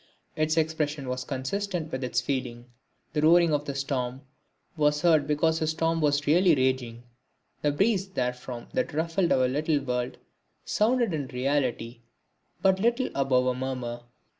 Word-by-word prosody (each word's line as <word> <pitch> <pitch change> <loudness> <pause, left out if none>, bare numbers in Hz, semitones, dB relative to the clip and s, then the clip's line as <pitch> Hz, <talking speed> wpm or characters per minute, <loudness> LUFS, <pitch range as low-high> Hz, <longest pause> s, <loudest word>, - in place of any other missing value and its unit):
Its 155 +1 0
expression 155 -3 -1
was 125 0 -3
consistent 160 +6 -3
with 130 0 -3
its 120 -1 0
feeling. 125 -2 -3 0.5
The 150 - 0
roaring 165 +1 +5
of 145 0 0
the 140 - -4
storm 130 -2 -2 0.5
was 150 0 +1
heard 160 -4 +4
because 160 +2 +1
a 155 - +1
storm 165 +1 0
was 145 -1 +1
really 170 +2 +5
raging. 130 -3 -1 0.6
The 145 - +2
breeze 195 +5 +1
therefrom 125 -6 -4
that 255 - -1
ruffled 165 +3 0
our 130 -1 +4
little 150 +3 0
world 125 -2 -3 0.5
sounded 230 -2 +1
in 145 -4 -2
reality 125 -3 -2 0.6
but 190 -1 +4
little 235 +5 +1
above 130 -2 +2
a 130 - +2
murmur. 125 -2 -4
145 Hz, 150 wpm, -27 LUFS, 130-165 Hz, 0.6 s, roaring